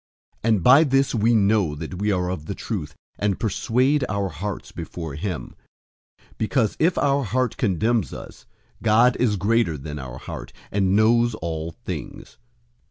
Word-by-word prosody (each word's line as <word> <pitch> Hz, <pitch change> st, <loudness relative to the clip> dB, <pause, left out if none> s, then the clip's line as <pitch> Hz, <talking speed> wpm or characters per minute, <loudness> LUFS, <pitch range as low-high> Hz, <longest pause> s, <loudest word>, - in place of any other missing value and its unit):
003:019 115 Hz, -, +1 dB
And 105 Hz, -6 st, +2 dB
by 135 Hz, +5 st, +8 dB
this 135 Hz, -2 st, +2 dB
we 115 Hz, 0 st, +3 dB
know 100 Hz, -6 st, +2 dB
that 80 Hz, +4 st, -6 dB
we 105 Hz, +1 st, +1 dB
are 90 Hz, -2 st, 0 dB
of 80 Hz, -4 st, -6 dB
the 100 Hz, -, -4 dB
truth, 80 Hz, -10 st, -5 dB, 0.2 s
and 100 Hz, -2 st, 0 dB
persuade 125 Hz, +6 st, +1 dB
our 100 Hz, -2 st, -1 dB
hearts 95 Hz, +5 st, -5 dB
before 80 Hz, -4 st, -6 dB
him, 75 Hz, -4 st, -4 dB, 0.7 s
003:020 -, -, -28 dB
because 110 Hz, -1 st, +1 dB
if 170 Hz, +3 st, +2 dB
our 140 Hz, 0 st, +2 dB
heart 125 Hz, +2 st, 0 dB
condemns 110 Hz, +1 st, +1 dB
us, -, -, -10 dB, 0.3 s
God 115 Hz, +3 st, +4 dB
is 115 Hz, -4 st, +2 dB
greater 100 Hz, -4 st, +1 dB
than 75 Hz, +1 st, -6 dB
our 65 Hz, -1 st, -7 dB
heart, -, -, -8 dB, 0.2 s
and 95 Hz, -1 st, +2 dB
knows 115 Hz, +2 st, +4 dB
all 80 Hz, -3 st, -4 dB
things. -, -, -7 dB
105 Hz, 165 wpm, -23 LUFS, 90-120 Hz, 0.7 s, by